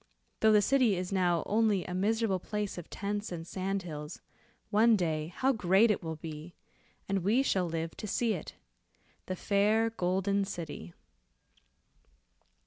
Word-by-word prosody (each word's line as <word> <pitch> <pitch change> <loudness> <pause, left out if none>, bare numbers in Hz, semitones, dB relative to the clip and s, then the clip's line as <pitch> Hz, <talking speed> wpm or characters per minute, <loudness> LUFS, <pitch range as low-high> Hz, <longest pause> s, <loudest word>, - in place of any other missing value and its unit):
Though 220 - +5
the 210 -1 +5
city 255 -6 +3
is 180 +1 -4
now 175 -4 +2
only 210 -3 +2
a 180 - -5
miserable 205 +1 +1
place 210 -1 -4
of 170 - -11
tents 205 +1 -4
and 165 -2 -5
sand 190 +2 -3
hills, 150 -2 -7 0.5
one 225 +2 +5
day 160 -5 -1
how 260 +10 +1
great 205 +1 +4
it 210 - -1
will 160 -2 -4
be, 155 +1 -8 0.5
and 195 0 0
we 215 +9 +2
shall 185 -9 +1
live 165 0 -3
to 215 - -6
see 230 +2 +1
it. 175 - -7 0.7
The 185 - -2
fair 215 +4 +2
Golden 195 0 0
City." 165 - -7
195 Hz, 150 wpm, -31 LUFS, 175-215 Hz, 0.7 s, Though